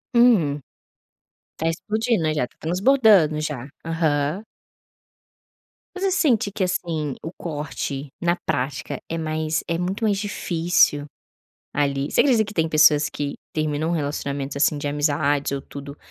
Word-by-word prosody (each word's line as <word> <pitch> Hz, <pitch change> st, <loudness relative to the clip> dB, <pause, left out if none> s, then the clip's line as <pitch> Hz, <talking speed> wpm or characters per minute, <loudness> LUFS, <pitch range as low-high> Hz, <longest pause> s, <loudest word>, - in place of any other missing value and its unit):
Hum. 205 Hz, -13 st, +4 dB, 1.0 s
Tá 165 Hz, -, -1 dB
explodindo, 215 Hz, +5 st, 0 dB
né, 155 Hz, -1 st, +1 dB
já 135 Hz, -5 st, 0 dB
tá -, -, -28 dB
transbordando, 185 Hz, -, +4 dB
já. 145 Hz, -4 st, -4 dB, 0.2 s
Aham. 160 Hz, +2 st, 0 dB, 1.5 s
Mas 375 Hz, -, -5 dB
você 390 Hz, -, +2 dB
sente 265 Hz, -, +2 dB
que, 200 Hz, -, -2 dB
assim, 165 Hz, -6 st, -2 dB
o 160 Hz, -, -5 dB
corte, 145 Hz, -3 st, -4 dB
na 170 Hz, 0 st, +2 dB
prática, 135 Hz, +2 st, -2 dB
é 165 Hz, -, -2 dB
mais 155 Hz, 0 st, -1 dB
é 170 Hz, -, 0 dB
muito 185 Hz, +5 st, -3 dB
mais 205 Hz, -3 st, +2 dB
difícil, 175 Hz, -7 st, +1 dB, 0.7 s
ali. 140 Hz, -1 st, 0 dB
Você -, -, +4 dB
acredita 240 Hz, -6 st, +3 dB
que 210 Hz, -, -9 dB
tem 160 Hz, -4 st, +1 dB
pessoas 155 Hz, -1 st, +5 dB
que 145 Hz, -1 st, -4 dB, 0.2 s
terminam 155 Hz, 0 st, -1 dB
relacionamentos, 140 Hz, -3 st, -3 dB
assim, 145 Hz, +1 st, +2 dB
de 145 Hz, -, -3 dB
amizades 145 Hz, -1 st, +1 dB
ou 140 Hz, -1 st, -2 dB
tudo 140 Hz, +1 st, -9 dB
155 Hz, 140 wpm, -23 LUFS, 145-185 Hz, 1.5 s, pessoas